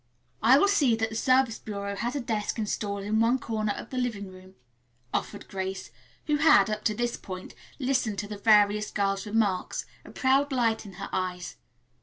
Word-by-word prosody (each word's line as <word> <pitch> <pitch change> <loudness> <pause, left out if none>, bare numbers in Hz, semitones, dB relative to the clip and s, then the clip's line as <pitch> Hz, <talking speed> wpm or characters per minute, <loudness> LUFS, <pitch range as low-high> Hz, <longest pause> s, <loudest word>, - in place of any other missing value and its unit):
"I 240 +5 +7
will 400 - +4
see 290 - +3
that 225 0 -1
the - - -6
Service 255 -1 +2
Bureau 200 -1 -5
has 240 +6 -3
a - - 0
desk 220 -2 -2
installed 205 -2 -2
in 215 +2 0
one 230 +3 +3
corner 215 -4 -2
of - - -9
the 255 - -2
living 210 -6 -3
room," 185 0 -15 0.6
offered 205 - -3
Grace, 190 0 -5 0.3
who 300 -1 +1
had, 290 -10 +5
up 215 0 -3
to 215 - +2
this 240 +2 -1
point, 185 -1 -8 0.2
listened 255 -6 0
to 205 - -3
the 205 -1 -7
various 210 -1 +4
girls' 195 0 -1
remarks, 205 -4 0 0.2
a - - -13
proud 275 +2 +2
light 230 -4 0
in 195 - -11
her 195 +2 -7
eyes. 180 -1 -3
215 Hz, 190 wpm, -27 LUFS, 200-240 Hz, 0.6 s, I